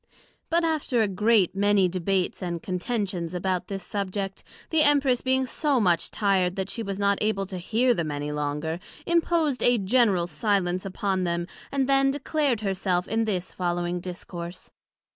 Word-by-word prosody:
But 335 +1 +2
after 300 -8 +1
a - - +1
great 205 0 +2
many 200 -1 +3
debates 185 +1 -1
and 170 -2 -4
contentions 185 -2 -2
about 180 0 -1
this 195 -1 -5
Subject, 195 -1 -3 0.3
the 320 -1 +4
Empress 280 -4 +4
being 260 0 +2
so 285 0 0
much 175 -6 +2
tired 190 -3 +1
that 190 0 -2
she 230 - -2
was 200 -2 -4
not 200 0 +2
able 210 -2 0
to 185 -1 -6
hear 235 +7 +2
them 170 -7 -2
any 145 0 -3
longer, 150 +3 -2 0.3
imposed 335 -5 +1
a 245 0 +4
general 200 -3 +3
silence 185 +1 0
upon 190 -1 -1
them, 170 -1 -1 0.3
and 275 -2 0
then 275 0 +4
declared 280 -3 0
her 195 -2 0
self 180 -1 -1
in 225 +1 0
this 185 -4 -2
following 175 0 -2
Discourse. 175 -1 -8
195 Hz, 165 wpm, -26 LUFS, 180-240 Hz, 0.3 s, the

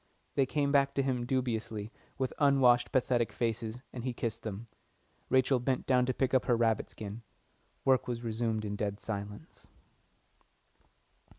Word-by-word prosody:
They 135 -2 +2
came 140 0 0
back 140 -1 +3
to 135 - +2
him 125 -2 -1
dubiously, 115 -4 -2 0.3
with 130 -2 -1
unwashed, 135 -4 +4
pathetic 120 -4 +2
faces, 115 +2 -2
and 120 - -6
he 125 -1 -2
kissed 115 -1 -3
them. 110 0 -5 0.6
Rachel 130 0 +3
bent 130 +1 -1
down 125 -1 +3
to 130 - +1
pick 130 -1 0
up 130 - +3
her 120 - +3
rabbit 115 -2 +1
skin. 105 +1 -7 0.6
Work 130 -1 +3
was 120 -1 -3
resumed 110 -1 -1
in 105 0 -3
dead 100 -1 -2
silence. 105 - -7
120 Hz, 155 wpm, -31 LUFS, 110-130 Hz, 0.6 s, unwashed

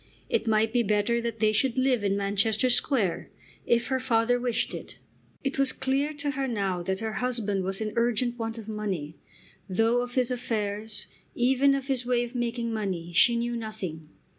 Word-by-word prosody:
It - - 0
might 220 0 +2
be 245 - +4
better 215 +2 +1
that 230 -1 -3
they 215 0 +4
should 255 +3 +1
live 255 -4 +2
in 200 0 +1
Manchester 205 +4 +1
Square, 240 - +1 0.4
if 235 +1 +2
her 265 -1 +1
father 245 -1 +2
wished 245 -2 -1
it. - - -8 0.5
It 275 0 -2
was 275 -1 +5
clear 270 +3 0
to 290 -1 -2
her 270 0 -2
now 195 -6 -1
that 190 +3 -2
her 220 -1 -2
husband 220 -6 0
was 195 +2 -2
in 215 -1 -2
urgent 240 +1 +1
want 225 0 -3
of 220 -2 -8
money, 195 -8 -4 0.5
though 225 +6 +2
of 245 0 -5
his 255 -1 +2
affairs, 220 -3 -2 0.3
even 265 +3 +4
of 275 -1 -3
his 265 -3 -1
way 245 -1 +1
of 240 +1 -7
making 235 -1 -2
money, 185 -6 -3
she 235 +7 +6
knew 235 +1 -1
nothing. 195 -9 -6
230 Hz, 190 wpm, -27 LUFS, 210-250 Hz, 0.5 s, she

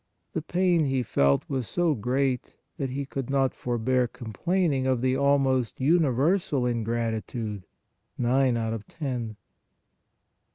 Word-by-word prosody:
The 160 - -1
pain 175 0 +2
He 135 -2 0
felt 70 -10 +2
was 130 -4 -2
so 175 -3 +1
great 130 +2 -1 0.2
that 135 -2 -2
He 140 +2 -3
could 135 -2 -5
not 135 -1 +2
forbear 125 +1 0
com 115 -1 -9
plaining 165 - +1
of 130 -2 +2
the 130 0 +2
almost 135 -3 +2
universal 145 0 +2
ingratitude, 115 -3 -2 0.5
nine 125 0 +2
out 110 -1 -1
of 110 -2 -6
ten 125 -8 -4
130 Hz, 130 wpm, -27 LUFS, 120-140 Hz, 0.5 s, pain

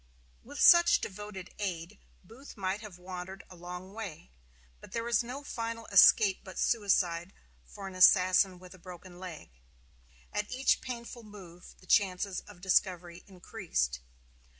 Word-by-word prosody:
With 285 +5 -10
such 345 -1 +7
devoted 195 -1 -8
aid 185 -1 -5 0.2
Booth 235 +8 -14
might 195 +1 -2
have 210 -5 -10
wandered 185 +1 -8
a - - -11
long 180 +2 -9
way; 190 - -8 0.5
but - - -14
there 230 0 -3
is 235 -3 +2
no 255 +4 -7
final 230 -3 -5
escape 200 0 +6
but 185 -2 -11
suicide 185 -5 +1 0.3
for 195 - -9
an 190 - -8
assassin 185 0 +5
with 180 +1 -13
a 185 - -16
broken 180 0 -12
leg. 175 - -9 0.8
At 210 0 -2
each 260 +2 +2
painful 240 -1 -7
move 190 -5 -13
the - - -17
chances 190 0 +1
of 200 -4 -14
discovery 180 -2 0
increased. 180 - -3
190 Hz, 145 wpm, -30 LUFS, 180-215 Hz, 0.8 s, such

